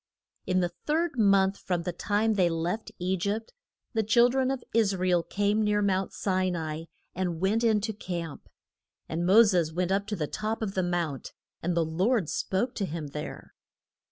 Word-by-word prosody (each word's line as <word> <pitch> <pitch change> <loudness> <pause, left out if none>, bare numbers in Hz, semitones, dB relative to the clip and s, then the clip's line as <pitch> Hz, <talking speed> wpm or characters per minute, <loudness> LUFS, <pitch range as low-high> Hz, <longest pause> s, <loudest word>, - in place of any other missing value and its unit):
In 185 0 +2
the 175 -1 0 0.2
third 310 -3 0
month 195 -2 +4
from 175 -2 -2
the 180 - -3
time 210 +5 +1
they 185 -4 +3
left 170 +6 -2
E 180 +2 0
gypt, 205 +5 -3 0.4
the 225 - +2
chil 235 +3 +5
dren 260 +1 +1
of 270 -2 -2
Is 215 -3 +3
ra 185 0 -1
el 175 -1 +4
came 205 +4 0
near 210 0 +2
Mount 190 -1 +1
Si 185 -1 0
na 170 -3 -2
i, 160 +2 -5 0.3
and 175 -2 -2
went 205 +5 +1
in 220 -3 +3
to 220 +1 -2
camp. 170 -6 -6 0.6
And 170 +2 -2
Mo 215 +5 +8
ses 180 -7 +2
went 180 +2 -1
up 200 +1 +1
to 210 - -2
the 160 -5 -1
top 215 +7 -3
of 195 -3 -3
the 190 - +1
Mount, 175 -6 -2 0.3
and 175 +1 -1
the 165 - +3
Lord 180 - +1
spoke 240 +7 -1
to 200 - 0
him 155 -3 -5
there. 150 +2 -7
190 Hz, 200 wpm, -28 LUFS, 175-215 Hz, 0.6 s, Mo